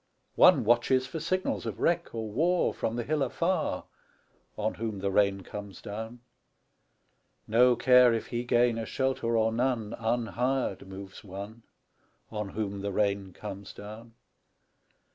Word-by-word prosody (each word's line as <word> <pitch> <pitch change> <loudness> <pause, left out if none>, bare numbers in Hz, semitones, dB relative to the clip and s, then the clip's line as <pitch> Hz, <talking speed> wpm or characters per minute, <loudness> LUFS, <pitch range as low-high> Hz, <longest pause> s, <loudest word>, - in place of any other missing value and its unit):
One - - +6
watches 120 +3 +3
for 130 +5 -5
signals 185 +4 -1
of - - -5
wreck 170 0 +1
or 110 -1 -3
war 165 +11 +1
From 115 - -2
the 120 - -2
hill 150 +4 -1
afar, 170 +8 0 0.7
On 110 +1 -1
whom 110 -2 -4
the 100 0 -1
rain 100 -1 +2
comes 100 +1 -8
down. 110 +3 -7 1.3
No 120 +3 +5
care 125 0 +6
if 115 -1 -1
he 120 0 -3
gain 120 -1 +2
a 115 - -3
shelter 130 -3 0
or 110 0 +2
none, 115 -2 -1
Unhired 120 -1 -1
moves 95 0 -9
one, 100 +3 -8 0.7
On 105 -2 -3
whom 100 -1 -3
the 100 0 -2
rain 100 -1 0
comes 100 +1 -8
down. 110 +3 -10
115 Hz, 145 wpm, -29 LUFS, 100-125 Hz, 1.3 s, One